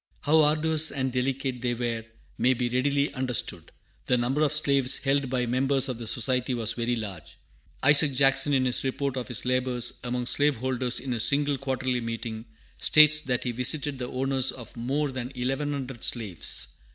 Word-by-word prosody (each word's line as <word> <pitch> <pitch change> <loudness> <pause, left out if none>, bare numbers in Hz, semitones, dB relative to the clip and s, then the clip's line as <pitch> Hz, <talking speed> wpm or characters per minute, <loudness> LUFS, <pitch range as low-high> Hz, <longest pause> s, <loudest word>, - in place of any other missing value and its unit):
How 155 +2 +4
arduous 155 +1 +2
and 130 -1 -2
delicate 130 0 -2
they 120 -1 -1
were 115 -1 -2 0.3
may 130 +1 +2
be 120 0 -1
readily 140 +3 +1
understood. 130 -3 -3 0.4
The 125 - +3
number 125 +5 0
of 150 - +3
slaves 140 -3 +3
held 135 -1 0
by 125 -1 0
members 135 +2 +2
of 125 -2 -4
the 115 - -6
Society 125 +2 0
was 115 -1 -1
very 120 +1 -1
large. 100 -8 -7 0.5
Isaac 145 +1 +6
Jackson, 135 +1 +3
in 130 -2 +2
his 125 - +1
report 135 0 -2
of 125 -2 -4
his 125 -2 -3
labors 125 -1 +1
among 125 0 -2
slave 145 +3 +2
holders 125 0 -1
in 130 -1 -4
a 120 - -2
single 145 +3 +1
Quarterly 130 -2 -1
Meeting, 115 -1 -5 0.3
states 155 0 +6
that 125 -2 -2
he 125 - -1
visited 135 +3 -2
the 125 -1 -4
owners 135 0 0
of 120 -4 -11
more 135 +5 -1
than 130 -1 -5
eleven 135 +4 -2
hundred 135 -4 -5
slaves. 95 - -2
130 Hz, 180 wpm, -27 LUFS, 120-140 Hz, 0.5 s, Isaac